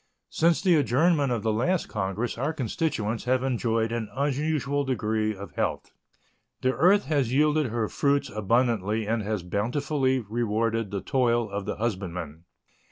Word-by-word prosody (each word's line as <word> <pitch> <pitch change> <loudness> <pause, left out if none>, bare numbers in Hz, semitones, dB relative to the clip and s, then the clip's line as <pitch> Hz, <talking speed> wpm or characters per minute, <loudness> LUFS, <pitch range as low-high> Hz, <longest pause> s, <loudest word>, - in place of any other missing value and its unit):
Since 165 0 +2
the 180 -4 +5
adjournment 145 +1 +2
of 115 -4 -1
the 110 -1 +1
last 170 +11 0
Congress 105 +3 -2
our 140 +7 -1
constituents 120 -5 -2
have 130 +1 +1
enjoyed 115 -3 0
an 115 -2 -3
unusual 145 +1 0
degree 110 -4 -1
of 100 +1 -9
health. - - -2 0.7
The 130 0 +2
earth 195 +7 +4
has 140 -6 0
yielded 150 +1 +3
her 115 -1 -1
fruits 140 +2 +1
abundantly 110 0 +1
and 115 +1 0
has 105 -3 -2
bountifully 130 - 0
rewarded 115 -1 -1
the 100 -1 -3
toil 120 0 +1
of 100 0 -4
the - - -3
husbandman. 90 -7 -4
120 Hz, 150 wpm, -26 LUFS, 110-140 Hz, 0.7 s, the